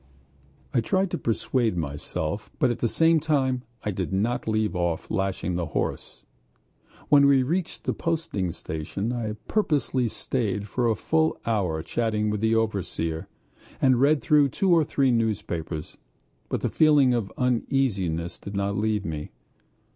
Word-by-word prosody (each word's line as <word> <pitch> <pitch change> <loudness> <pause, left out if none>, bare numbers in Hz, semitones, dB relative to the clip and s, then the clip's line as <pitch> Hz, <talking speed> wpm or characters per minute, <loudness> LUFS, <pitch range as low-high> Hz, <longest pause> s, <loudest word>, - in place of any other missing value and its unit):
I 120 - +3
tried 190 +9 0
to - - -1
persuade 115 -2 0
myself, 75 +4 -3
but 125 - +3
at 120 - -4
the 120 - +1
same 165 +6 +4
time 135 -5 +1 0.2
I 105 - -1
did 95 -1 -3
not 110 +6 0
leave 110 -2 0
off 85 -2 -1
lashing 95 -3 -1
the 85 -2 -2
horse. - - -3 0.9
When 140 -1 +7
we 135 -2 +5
reached 170 +6 -2
the - - 0
posting 160 - -2
station 85 +10 -4
I 115 -3 -2
purposely 145 - +1
stayed 105 -3 -2
for 120 +3 0
a 110 - +2
full 160 +8 +1
hour 90 -9 0
chatting 105 +2 0
with 105 -1 -2
the 110 0 +3
overseer, 90 -7 -1 0.5
and 130 -2 +4
read 145 +1 +4
through 145 -2 +4
two 190 +6 +1
or 165 -2 +5
three 135 -2 +1
newspapers, 100 -9 -2 0.5
but - - -2
the - - 0
feeling 145 -5 +5
of 115 -5 -1
uneasiness 100 -10 0
did 100 - -8
not 100 0 0
leave 105 -1 0
me. 75 -2 -4
110 Hz, 155 wpm, -26 LUFS, 95-135 Hz, 0.9 s, When